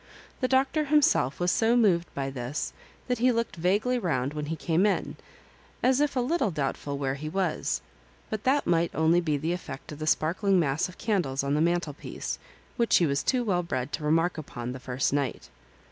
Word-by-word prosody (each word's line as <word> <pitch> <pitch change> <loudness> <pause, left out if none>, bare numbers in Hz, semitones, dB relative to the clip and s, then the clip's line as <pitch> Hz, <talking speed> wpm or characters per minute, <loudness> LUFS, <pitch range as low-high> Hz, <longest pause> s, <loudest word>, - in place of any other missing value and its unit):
The 255 - +1
Doctor 270 +4 +2
himself 285 - +3
was 175 0 +2
so 230 +2 +3
moved 180 -7 +3
by 135 -1 -2
this, 130 +2 -4 0.3
thajb 250 -1 0
he 250 +2 +4
looked 230 -1 -1
vaguely 205 +9 +1
round 140 - -1
when 150 -1 -4
he 165 - -2
came 165 +5 +2
in, 200 - -1 0.7
as 260 +2 +4
if 295 -2 +1
a - - +2
little 270 -2 +1
doubtful 140 -2 -3
where 135 -1 -1
he 150 +3 -5
was 190 +3 -1 0.3
— - - -14
^but 215 - -2
that 275 +4 +2
might 170 0 +2
only 160 +2 +4
be 155 -4 0
the 160 +4 -1
effect 180 -2 -7
of 150 - -8
the 155 - -4
sparkling 185 +5 +2
mass 145 +1 +1
of 180 - -13
candles 175 -12 0
on 140 0 0
the 150 - +2
mantelpiece, 170 -3 -2 0.4
which 235 -2 +4
he 175 - +3
was 140 -2 +1
too 255 -2 +1
well 185 -6 +1
bred 145 -6 -3
to 155 - -3
remark 165 +3 +2
upon 125 -5 -6
the 130 - -7
first 130 +1 -1
night. 140 -1 -2
170 Hz, 205 wpm, -27 LUFS, 145-220 Hz, 0.7 s, he